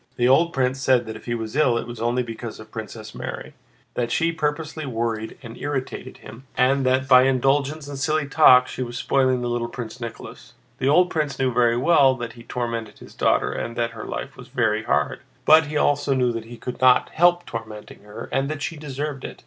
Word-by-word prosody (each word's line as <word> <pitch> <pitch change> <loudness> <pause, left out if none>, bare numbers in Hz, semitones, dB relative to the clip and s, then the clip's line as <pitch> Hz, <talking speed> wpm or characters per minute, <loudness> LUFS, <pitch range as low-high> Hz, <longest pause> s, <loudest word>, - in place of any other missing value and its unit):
The 120 - +2
old 160 +6 +4
prince 130 -1 0
said 130 -3 +3
that 110 0 -6
if 110 - -12
he 120 - -2
was 110 +1 -5
ill 130 -6 +3
it - - -3
was 120 -1 -8
only 120 +2 +1
because 115 -1 -7
of 110 - -12
Princess 110 -1 -8
Mary: - - -7 0.4
that 120 -1 -2
she 165 +1 +1
purposely 155 0 -3
worried 115 -4 -3
and 115 -1 -9
irritated 130 -2 -5
him, 115 +5 -13
and 135 +2 +3
that 130 +1 +2
by 130 -1 +7
indulgence 140 +3 +1
and 140 -1 -6
silly 155 +1 0
talk 130 -4 +6
she - - -6
was 120 -1 -4
spoiling 130 -1 +1
little 120 -1 -1
Prince 120 0 -8
Nicholas. 115 -1 -9 0.3
The 135 - +1
old 180 +5 +4
prince 150 -3 -1
knew 130 -2 0
very 120 -1 +3
well 135 -1 +4
that 120 -2 -6
he 120 - -13
tormented 115 -2 -4
his - - -14
daughter - - +1
and 115 - -4
that 115 -1 -1
her 115 -2 -8
life - - -5
was - - -12
very 110 -4 0
hard, 75 0 0 0.3
but 155 0 +6
he 150 0 -2
also 145 -1 +2
knew 125 -2 +2
that 115 -1 -5
he 120 +1 -10
could 125 +1 -7
not 130 -1 +5
help 175 +1 +3
tormenting 110 - -8
her 105 +1 -9
and 135 +1 0
that 150 -2 -4
she 165 - -4
deserved 145 -1 -5
it. - - -8
125 Hz, 215 wpm, -23 LUFS, 115-140 Hz, 0.4 s, by